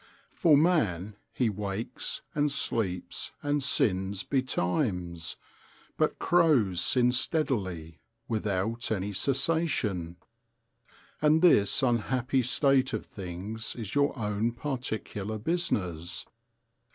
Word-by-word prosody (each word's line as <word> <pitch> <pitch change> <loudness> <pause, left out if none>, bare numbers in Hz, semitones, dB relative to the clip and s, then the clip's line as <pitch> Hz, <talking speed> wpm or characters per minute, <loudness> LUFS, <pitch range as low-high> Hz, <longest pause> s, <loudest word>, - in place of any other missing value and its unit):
For 160 -7 +5
man, 110 - +1 0.2
he 120 +1 +1
wakes 100 +2 -4
and 145 0 +1
sleeps 95 -9 -2
and 145 0 +1
sins 95 -6 +1
betimes: 90 - -1 0.6
but - - +1
crows 135 - +3
sin 125 +6 +4
steadily, 100 - -1 0.3
without 110 +1 -1
any 100 -1 -1
cessation. 130 - 0 1.1
And 155 +2 +4
this 135 - +5
unhappy 125 +2 +1
state 135 +1 +2
of 110 - -3
things 100 +4 -6
is 110 -4 -6
your 145 -1 +2
own 105 +1 -1
particular 110 -5 -4
business. 95 - -2
110 Hz, 95 wpm, -29 LUFS, 95-140 Hz, 1.1 s, For